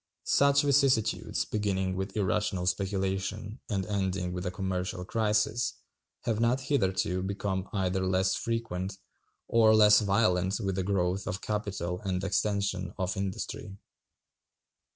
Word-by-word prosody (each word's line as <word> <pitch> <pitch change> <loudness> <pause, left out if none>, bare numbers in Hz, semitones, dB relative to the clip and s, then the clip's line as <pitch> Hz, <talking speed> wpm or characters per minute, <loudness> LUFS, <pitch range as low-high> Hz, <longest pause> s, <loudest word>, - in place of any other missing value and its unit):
Such 140 +1 +4
vicissitudes, 135 -6 +2
beginning 95 -3 -1
with 95 +3 -4
irrational 95 -2 0
speculation 95 +3 -2
and 95 -3 -1
ending 95 -2 -1
with 90 +1 -3
a - - +1
commercial 90 -1 -3
crisis, 110 +2 +1 0.5
have 110 -2 -1
not 120 +3 +2
hitherto 95 -9 0
become 95 0 -3
either 95 -1 0
less 95 0 +2
frequent 105 -5 -3 0.5
or 110 -1 +5
less 105 -1 +7
violent 100 -3 +2
with 95 -1 -1
the 95 - -1
growth 95 0 0
of 95 - -3
capital 100 -5 -3
and 95 -1 -2
extension 100 -2 -1
of 95 -1 -1
industry. 100 +1 -4
95 Hz, 125 wpm, -29 LUFS, 95-105 Hz, 0.5 s, less